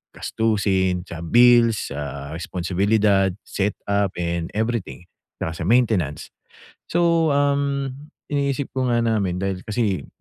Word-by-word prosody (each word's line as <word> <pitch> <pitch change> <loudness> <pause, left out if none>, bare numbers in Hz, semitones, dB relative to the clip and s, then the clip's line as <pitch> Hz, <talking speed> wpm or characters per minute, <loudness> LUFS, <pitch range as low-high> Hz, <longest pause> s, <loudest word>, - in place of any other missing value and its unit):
Gastusin, 95 -5 0
sa 85 -3 -8
bills, 120 +2 +4
sa 70 0 -6
responsibilidad, 95 +4 +1 0.2
set 100 +1 -2
up 100 -1 +1
and 85 -1 -2
everything 110 -5 -2 0.3
tsaka 80 0 -4
sa - - -1
maintenance. 110 - +1 0.5
So, 170 -3 +2
um, 140 -1 +1 0.4
iniisip 140 -1 -1
ko 130 0 -1
nga 120 -1 +2
namin 100 -5 0
dahil 95 +1 -3
kasi 105 - -1
105 Hz, 120 wpm, -22 LUFS, 90-120 Hz, 0.5 s, bills